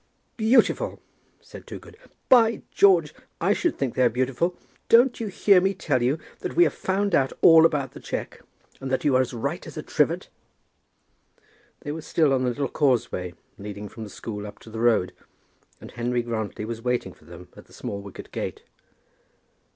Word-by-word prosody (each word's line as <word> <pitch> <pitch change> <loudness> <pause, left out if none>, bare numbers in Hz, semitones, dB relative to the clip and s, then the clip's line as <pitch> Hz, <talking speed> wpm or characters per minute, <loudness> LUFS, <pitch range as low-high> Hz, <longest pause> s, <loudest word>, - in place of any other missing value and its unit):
"Beautiful!" 245 - +2 0.4
said - - -13
Toogood. - - -10 0.3
"By 230 -4 +4
George, 175 -7 +4 0.3
I 190 +5 +2
should 345 +8 -1
think 135 -4 -2
they - - -1
are 125 - +5
beautiful! 130 +9 -1 0.3
Don't 240 +2 +5
you 225 - -3
hear 195 -1 +4
me 195 +1 +1
tell 145 -8 0
you 130 +5 +1 0.2
that - - -5
we 175 - +6
have 165 - +1
found 195 +1 -1
out 135 -4 +2
all 165 0 +8
about 145 -4 -3
the - - -11
cheque, - - -6 0.4
and 135 - -5
that 130 - -1
you're 130 -3 +4
as 130 - -2
right 120 -3 -4
as - - -10
a - - -4
trivet?" - - 0 1.5
They 145 - -5
were 160 +2 -5
still 155 -2 +2
on 130 - +1
the 125 - +1
little 140 +3 -2
causeway 115 - 0 0.2
leading 105 0 -7
from 110 +3 -9
the 105 - -8
school 105 0 -7
up 105 - -11
to 110 - -13
the 110 - -6
road, 110 -6 +2 0.7
and - - -11
Henry 120 0 -1
Grantly 110 -3 -4
was 115 0 -6
waiting 125 0 -2
for - - -23
them - - -12
at - - -14
the - - -25
small 100 0 -6
wicket 100 -1 -11
gate. - - -5
130 Hz, 185 wpm, -25 LUFS, 115-175 Hz, 1.5 s, all